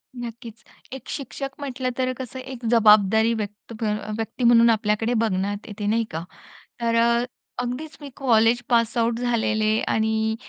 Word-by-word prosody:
नक्कीच. 235 -2 -8 0.3
एक 265 - -9
शिक्षक 275 0 -5
म्हटलं 260 -2 -3
तर 255 -1 0
कसं 260 0 -7
एक 255 -2 -8
जबाबदारी 220 0 +5
व्यक्त 210 +1 -6
अ, 215 0 -2
व्यक्ती 225 +3 -4
म्हणून 235 0 +6
आपल्याकडे 220 +1 +1
बघण्यात 205 -2 -1
येते 210 0 -6
नाही 230 +2 +2
का? 160 +1 -4 0.6
तर 230 0 +1
अ, 235 +1 +3 0.4
अगदीच 250 +6 -4
मी 285 - -8
कॉलेज 235 -2 +3
पासआउट 230 0 +2
झालेले 220 -3 +1
आणि 220 0 +1
230 Hz, 145 wpm, -23 LUFS, 220-245 Hz, 0.6 s, म्हणून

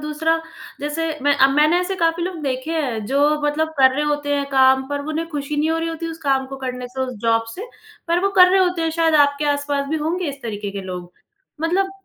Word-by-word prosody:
दूसरा 305 +2 0 0.4
जैसे 295 +3 -2 0.2
मैं 290 0 +3
अ, 270 - +6
मैंने 305 +5 +3
ऐसे 380 +2 -2
काफ़ी 330 +1 +1
लोग 360 -3 -5
देखे 260 +3 -3
हैं 250 -9 -2
जो 290 +3 +2
मतलब 315 +2 0
कर 260 -1 +7
रहे 295 - 0
होते 290 -1 -1
हैं 280 0 -1
काम 265 0 +4
पर 285 0 -2
वो 310 - -5
उन्हें 325 +2 -2
खुशी 295 -1 -4
नहीं 310 +2 +1
हो 325 - 0
रही 330 - -2
होती 330 0 -5
उस 325 - -8
काम 270 -2 +1
को 270 0 -8
करने 250 -1 -5
से 260 +2 -7
उस 255 -1 -2
जॉब 225 0 +2
से, 435 +6 -7 0.4
पर 345 +1 +2
वो - - +4
कर 365 0 +9
रहे 380 0 +4
होते 360 -2 +1
हैं 325 - 0
शायद 325 -1 +3
आपके 285 +1 -3
आस-पास 285 -1 -2
भी 315 - -1
होंगे 325 +2 -2
इस 280 0 -7
तरीके 205 -3 -4
के 200 0 -5
लोग। 180 -1 -7 0.5
मतलब 380 +4 +1
295 Hz, 245 wpm, -21 LUFS, 265-325 Hz, 0.5 s, कर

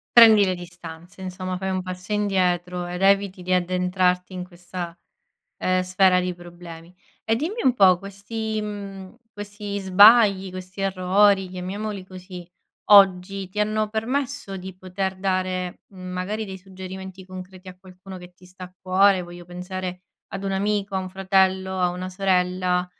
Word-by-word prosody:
Prendi 220 -3 +9
le 185 -1 0
distanze, 175 0 -11
insomma 185 0 -4
fai 190 +1 -3
un 185 -1 -2
passo 185 +2 -7
indietro 180 -3 0
ed 180 +2 -4
eviti 195 -1 +2
di 185 +1 0
addentrarti 180 0 +1
in 180 -1 -5
questa, 175 -1 -8 0.6
ehm, 185 0 +1
sfera 185 0 +3
di 180 0 -2
problemi 175 -1 -12 0.3
e 225 - +2
dimmi 335 - -3
un 260 - +5
po' 185 -5 +5
questi, 215 +3 -5
mhmm, 200 -1 -7 0.2
questi 205 -1 -6
sbagli, 200 0 +6
questi 185 +1 -8
errori, 195 +1 +3
chiamiamoli 190 +2 -5
così, 185 -1 -10 0.4
oggi 195 -1 +5
ti 205 - -9
hanno 215 0 0
permesso 235 0 -3
di 185 0 -9
poter 190 +1 -4
dare, 185 -1 -2
mhmm, 185 -2 -10
magari 205 +4 -3
dei 190 -2 -8
suggerimenti 190 0 -9
concreti 185 0 -10
a 180 - -10
qualcuno 185 0 -12
che 180 0 -13
ti 180 - -20
sta 185 +1 -11
a 180 0 -14
cuore, 190 0 +3
voglio 175 0 -11
pensare 180 0 -6 0.3
ad 195 0 -6
un 195 - -1
amico, 200 0 -1
a 190 - +1
un 185 - -4
fratello, 190 0 +1
a 180 - +3
una 180 +1 -5
sorella, 180 -1 +1
185 Hz, 155 wpm, -23 LUFS, 180-195 Hz, 0.6 s, Prendi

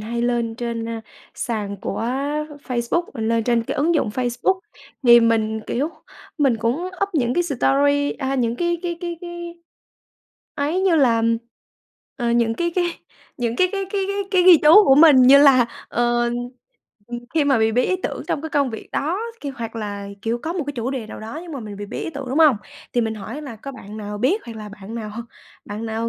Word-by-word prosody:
hay 235 +2 -3
lên 235 -2 0
trên, 235 -1 -4
a, 230 -1 -4 0.3
sàn 210 -4 -3
của 195 - -4 0.7
Facebook 240 +7 0
lên 225 -1 0
trên 235 -1 +2
cái - - -4
ứng 325 +4 +2
dụng 295 - +1
Facebook. 250 - 0 0.4
Thì 240 -1 +8
mình, 220 -1 +1
kiểu, 280 +6 -1 0.5
mình 270 -6 +3
cũng 230 +2 0 0.3
up 400 - +2
những 245 -4 +1
cái 350 - +2
story 285 -1 +2
a, 270 -1 -3
những 240 -2 0
cái 345 -1 0
cái 345 -1 -3
cái 345 -2 -4
cái 345 -1 -8 1.0
ấy 305 +6 0
như 370 -4 +3
là, 235 -5 +3 0.9
ờ, 235 -2 -1
những 235 -1 +2
cái 345 +4 -1
cái 355 - +3 0.5
những 235 -2 -2
cái 365 - +3
cái 390 -1 -2
cái 395 -1 -1
cái 400 - -2
cái 370 -2 +4
ghi 360 -2 +9
chú 340 +8 +8
của 270 - +6
mình 300 -1 +8
như 270 +3 +8
là, 270 -4 +6 0.2
ờ, 240 0 +1 1.0
khi 310 - +3
mà 275 -4 +3
bị 220 0 +2
bí 250 +2 +2
ý 370 - +1
tưởng - - -3
trong 290 - -1
cái 320 - -4
công 280 -4 +1
việc 220 - -8
đó 330 +7 -1 0.2
kia 285 - -4
hoặc 230 -1 -6
là, 205 -2 -5
kiểu, 230 +1 -1
có 330 - -2
một 345 -6 -3
cái 290 - -3
chủ 240 +2 -2
đề 250 -5 -4
nào - - -9
đó 225 +8 -7
nhưng 340 -3 -9
mà 270 - -5
mình 210 -2 -8
bị 205 0 -6
bí - - -6
ý - - -4
tưởng, 280 -3 -7
đúng 270 - -1
hông? 300 -8 +6 0.4
Thì 240 - +2
mình 225 -1 -1
hỏi 225 +8 -7
là 250 -6 -8
có 275 +5 -8
bạn 210 -4 -10
nào 210 -1 -6
biết 305 - +1
hoặc 230 - -8
là 215 -1 -7
bạn 205 +1 -10
nào 215 -2 -5 0.5
bạn 215 +2 -6
nào 225 +1 -2
245 Hz, 215 wpm, -21 LUFS, 225-305 Hz, 1.0 s, ghi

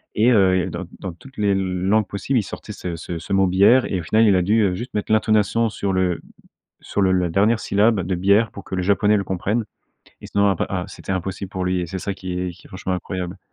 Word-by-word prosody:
et 115 +4 +4
heu, 95 -4 +4
et 90 +1 -1
dans 95 - -5
dans 95 -3 -5
toutes 135 +10 -16
les 105 -1 +2
langues 95 +2 +1
possibles, 120 +6 -1
il 105 - -1
sortait 105 - -8
ce 85 -3 -5
ce 85 0 -6
ce 100 - -5
mot 95 0 +4
bière 100 +8 +5
et 95 - -2
au - - -6
final, 110 +7 +3
il 100 -3 +5
a 90 - +3
dû, 105 +5 +2
heu, 95 -3 +2
juste 120 +7 -7
mettre 105 +1 -2
l'intonation 110 +1 +2
sur 100 -2 -2
le 90 -2 +1 0.6
sur - - -2
le 95 -1 +3
la 90 -2 +1
dernière 105 +6 +3
syllabe 105 0 +2
de 95 - -1
bière, 100 +5 +3
pour 100 - -10
que - - -6
le 90 - -1
japonais 100 +2 +3
le 100 - -1
comprenne, 100 +5 -1 0.6
et - - -9
sinon, 100 0 +2
après 95 - 0
ah, 90 -2 -2
c'était 95 - -6
impossible 95 +1 -4
pour 95 -2 -3
lui 90 0 0
et - - -3
c'est 95 +3 -5
ça 100 - -3
qui 95 -1 -6
est 90 0 -2
qui - - -18
est - - -17
franchement 95 0 -4
incroyable. 90 0 -5
95 Hz, 255 wpm, -21 LUFS, 90-105 Hz, 0.6 s, bière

